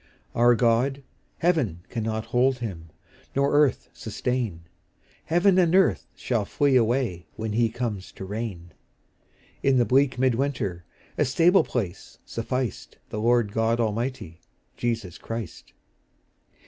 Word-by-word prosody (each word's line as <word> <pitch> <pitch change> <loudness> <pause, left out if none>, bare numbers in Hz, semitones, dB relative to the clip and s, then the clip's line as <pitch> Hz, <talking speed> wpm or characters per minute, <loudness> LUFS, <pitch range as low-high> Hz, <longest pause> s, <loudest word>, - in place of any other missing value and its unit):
Our 120 +1 +5
God, 125 +4 +2 0.3
heaven 140 - 0
cannot 110 -1 -3
hold 130 +1 +3
Him, 95 -9 -6 0.5
Nor 140 +1 +2
earth 145 -2 +3
sustain; 120 -10 -3 0.6
Heaven 180 +3 +4
and 175 -1 +3
earth 190 -2 +3
shall 120 -4 -1
flee 140 +6 +1
away 115 -8 +1
When 110 -1 -4
He 115 +1 +2
comes 110 -5 -4
to 95 - -8
reign: 95 -4 -5 0.9
In 135 -1 +3
the 120 - +4
bleak 130 +1 +3
mid 130 0 +3
winter 115 - -2 0.3
A - - +4
stable 170 +8 +4
place 100 -7 -4
sufficed 115 - -4
The 105 - -4
Lord 120 -2 +3
God 115 +2 +1
Almighty, 115 -6 -2 0.3
Jesus 115 -7 -3
Christ. 115 -6 -7
120 Hz, 125 wpm, -25 LUFS, 105-130 Hz, 0.9 s, Our